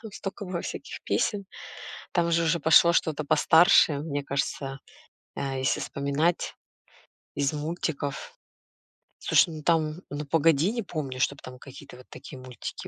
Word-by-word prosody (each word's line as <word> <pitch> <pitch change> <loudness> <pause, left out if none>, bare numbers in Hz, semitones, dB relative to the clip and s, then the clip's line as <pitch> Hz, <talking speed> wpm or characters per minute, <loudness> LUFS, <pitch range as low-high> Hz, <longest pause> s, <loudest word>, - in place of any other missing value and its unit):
там 220 -3 -10
стока 195 +1 -6
было 180 -2 -4
всяких - - -7
песен. 200 -2 0 0.7
Там 170 -1 +1
же 170 0 +2
уже 165 +1 +1
пошло 165 +2 +6
что-то 155 -2 0
постарше, 160 +1 +5
мне 145 -1 -3
кажется, 135 0 -3 0.6
э, 135 -1 -3
если 130 0 0
вспоминать 140 +5 -1 0.8
из 140 +1 0
мультиков. 150 -2 -4 0.8
Слушай, 165 - +3
ну 155 - -9
там, 160 0 +1
"Ну, 145 +1 -5
погоди!", 165 +3 +3
не 235 -2 -3
помню, 140 -8 -5
чтобы 140 +1 0
там 130 0 -10
какие-то 135 -1 -12
вот 125 - -15
такие 135 0 -11
мультики 130 -1 -8
155 Hz, 145 wpm, -26 LUFS, 140-170 Hz, 0.8 s, пошло